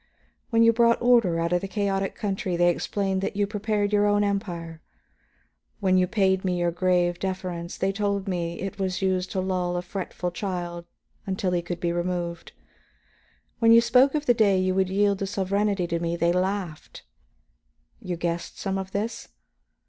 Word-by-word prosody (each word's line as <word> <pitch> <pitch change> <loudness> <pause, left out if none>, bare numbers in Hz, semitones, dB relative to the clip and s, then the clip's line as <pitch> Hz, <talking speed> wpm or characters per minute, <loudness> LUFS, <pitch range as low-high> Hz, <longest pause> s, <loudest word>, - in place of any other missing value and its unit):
When 230 -1 +4
you 230 0 +6
brought 235 0 +4
order 230 -9 +3
out 170 +1 0
of 175 - +2
the 195 - -4
chaotic 195 -1 -1
country, 190 -3 -2
they 175 0 +4
explained 190 +2 -1
that 195 - -3
you 205 0 +2
prepared 210 0 -1
your 205 0 +4
own 205 0 +3
Empire; 175 -5 -3 1.0
when 190 -3 +2
you 185 0 +3
paid 190 -1 +1
me 180 -2 0
your 175 0 +1
grave 175 0 +1
deference, 185 -2 -4
they 190 - 0
told 200 -1 -1
me 170 -2 -3
it 195 +1 -5
was 190 0 -2
used 185 -1 0
to 190 - -2
lull 180 -1 -1
a 175 - -3
fretful 180 -1 -4
child 175 -2 -4 0.4
until 190 -1 -1
he 175 -1 +1
could 175 0 -5
be 170 -1 -1
removed. 175 -1 -3 1.1
When 230 -1 +5
you 230 - +9
spoke 250 +4 +4
of 300 -1 -1
the 245 - +5
day 210 -5 +3
you 185 0 +1
would 190 0 +1
yield 200 0 +2
the 195 - -2
sovereignty 200 0 0
to 170 -1 -2
me, 170 0 -1
they 170 0 +2
laughed. 185 -3 -3 1.0
You 180 -1 -3
guessed 170 0 -3
some 195 -1 -2
of 190 0 -7
this? 215 +3 -3
190 Hz, 180 wpm, -25 LUFS, 175-205 Hz, 1.1 s, you